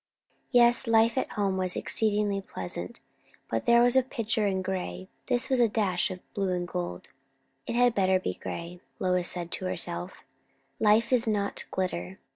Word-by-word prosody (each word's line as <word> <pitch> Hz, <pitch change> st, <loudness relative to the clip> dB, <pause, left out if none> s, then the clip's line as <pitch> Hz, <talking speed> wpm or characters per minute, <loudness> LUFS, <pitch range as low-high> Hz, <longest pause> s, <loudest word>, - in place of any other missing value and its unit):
Yes, 240 Hz, 0 st, +5 dB
life 230 Hz, 0 st, +4 dB
at 260 Hz, -, -2 dB
home 200 Hz, -3 st, 0 dB
was 185 Hz, -1 st, -1 dB
exceedingly 210 Hz, -2 st, 0 dB
pleasant, 90 Hz, -, -6 dB, 0.5 s
but 115 Hz, 0 st, -1 dB
it 235 Hz, 0 st, +7 dB
was 245 Hz, +1 st, +4 dB
a 260 Hz, -, +7 dB
picture 225 Hz, -4 st, -1 dB
in 190 Hz, -1 st, -1 dB
grey; 185 Hz, 0 st, -4 dB, 0.2 s
this 250 Hz, 0 st, 0 dB
was 260 Hz, -1 st, +1 dB
a 235 Hz, -2 st, +4 dB
dash 195 Hz, -5 st, 0 dB
of 185 Hz, -1 st, -7 dB
blue 195 Hz, -2 st, -1 dB
and 175 Hz, 0 st, -2 dB
gold. 90 Hz, -, -5 dB, 0.6 s
It -, -, -2 dB
had 245 Hz, 0 st, +4 dB
better 190 Hz, -2 st, +3 dB
be 90 Hz, -, -3 dB
grey, 170 Hz, -, -7 dB, 0.2 s
Lois 180 Hz, -1 st, +1 dB
said 175 Hz, -1 st, -4 dB
to 185 Hz, -, -3 dB
herself; 90 Hz, -, -3 dB, 0.6 s
life 225 Hz, +3 st, +3 dB
is 240 Hz, -2 st, +3 dB
not 205 Hz, -2 st, 0 dB
glitter. 95 Hz, -, -3 dB
195 Hz, 170 wpm, -28 LUFS, 180-230 Hz, 0.6 s, it